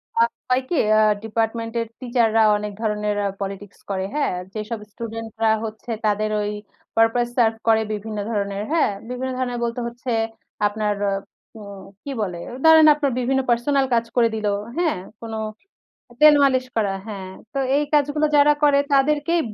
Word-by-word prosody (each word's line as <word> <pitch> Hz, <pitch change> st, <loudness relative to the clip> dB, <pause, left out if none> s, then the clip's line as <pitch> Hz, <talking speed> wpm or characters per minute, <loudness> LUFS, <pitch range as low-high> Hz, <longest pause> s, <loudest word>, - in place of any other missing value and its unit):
আ -, -, +1 dB, 0.3 s
হয় 255 Hz, +1 st, +3 dB
কি? 350 Hz, -, 0 dB, 0.2 s
আ -, -, +5 dB, 0.2 s
ডিপার্টমেনট 225 Hz, +1 st, -2 dB
এর 230 Hz, -, -4 dB
টিচার 240 Hz, -2 st, +1 dB
রা -, -, +6 dB, 0.2 s
অনেক 210 Hz, 0 st, -4 dB
ধরনের 210 Hz, -1 st, -1 dB, 0.2 s
পলিটিক্স 195 Hz, 0 st, -6 dB
করে, 190 Hz, -1 st, -1 dB
হ্যাঁ? 295 Hz, -8 st, 0 dB, 0.2 s
যেসব 215 Hz, +1 st, -4 dB
স্টুডেন্ট 225 Hz, +1 st, -6 dB
রা 220 Hz, -, +5 dB
হচ্ছে 220 Hz, +2 st, -7 dB
তাদের 215 Hz, 0 st, +1 dB
ওই, 205 Hz, 0 st, -2 dB, 0.4 s
পারপাস 225 Hz, +2 st, +3 dB
সারভ 225 Hz, -2 st, +3 dB
করে 220 Hz, -1 st, +5 dB
বিভিন্ন 215 Hz, +1 st, -5 dB
ধরনের, 200 Hz, -1 st, -2 dB
হ্যাঁ? 320 Hz, -9 st, +3 dB, 0.2 s
বিভিন্ন 255 Hz, +1 st, -3 dB
ধরনের 245 Hz, -2 st, -2 dB
বলতে 235 Hz, +1 st, -2 dB
হচ্ছে, 240 Hz, +1 st, -6 dB, 0.6 s
আপনার 210 Hz, 0 st, -1 dB, 0.2 s
আ -, -, 0 dB, 0.4 s
উম 200 Hz, -2 st, -10 dB, 0.2 s
কি 280 Hz, -, -5 dB
বলে? 180 Hz, -4 st, -3 dB, 0.3 s
ধরেন 320 Hz, -1 st, +8 dB
আপনার 290 Hz, -2 st, 0 dB
বিভিন্ন 265 Hz, +2 st, +1 dB
পার্সোনাল 265 Hz, +4 st, +2 dB
কাজ 230 Hz, -1 st, +2 dB
করে 235 Hz, -2 st, +4 dB
দিল, 215 Hz, -1 st, -2 dB, 0.3 s
হ্যাঁ? 340 Hz, -, +1 dB, 0.2 s
কোনো 225 Hz, -1 st, -5 dB, 0.8 s
তেল 305 Hz, 0 st, +9 dB
মালিশ 260 Hz, -2 st, +3 dB
করা, 205 Hz, -3 st, +1 dB
হ্যাঁ। 195 Hz, -3 st, -6 dB, 0.2 s
তো -, -, -3 dB, 0.2 s
এই 290 Hz, -, +2 dB
কাজগুলো 295 Hz, +1 st, +2 dB
যারা 290 Hz, +1 st, +6 dB
করে, 285 Hz, -1 st, +5 dB
তাদেরকেই 300 Hz, +5 st, +2 dB
230 Hz, 165 wpm, -22 LUFS, 210-270 Hz, 0.8 s, তেল